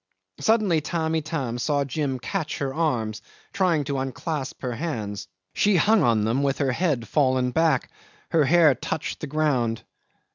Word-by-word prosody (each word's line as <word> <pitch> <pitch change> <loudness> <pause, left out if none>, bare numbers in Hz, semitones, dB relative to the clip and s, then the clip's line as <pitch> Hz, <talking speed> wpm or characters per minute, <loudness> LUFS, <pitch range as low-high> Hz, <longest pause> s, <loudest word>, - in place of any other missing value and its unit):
'Suddenly 210 -8 +2
Tamb' 160 +1 -2
Itam 150 -7 -2
saw 145 +2 +1
Jim 135 -1 -2
catch 160 +5 -3
her 135 -2 -2
arms, 120 -10 -1 0.3
trying 175 -6 +2
to 140 -1 -2
unclasp 135 +2 -4
her 125 - -2
hands. 105 - -4 0.3
She 205 -1 +3
hung 215 +3 +4
on 115 -6 +3
them 115 +5 +1
with 140 -1 0
her 135 -2 +1
head 135 -6 0
fallen 130 -3 +2
back; 160 -3 +1 0.4
her 160 -3 +4
hair 160 0 +5
touched 135 +4 -4
the 155 - -5
ground. 135 -7 0
145 Hz, 155 wpm, -24 LUFS, 125-160 Hz, 0.4 s, hair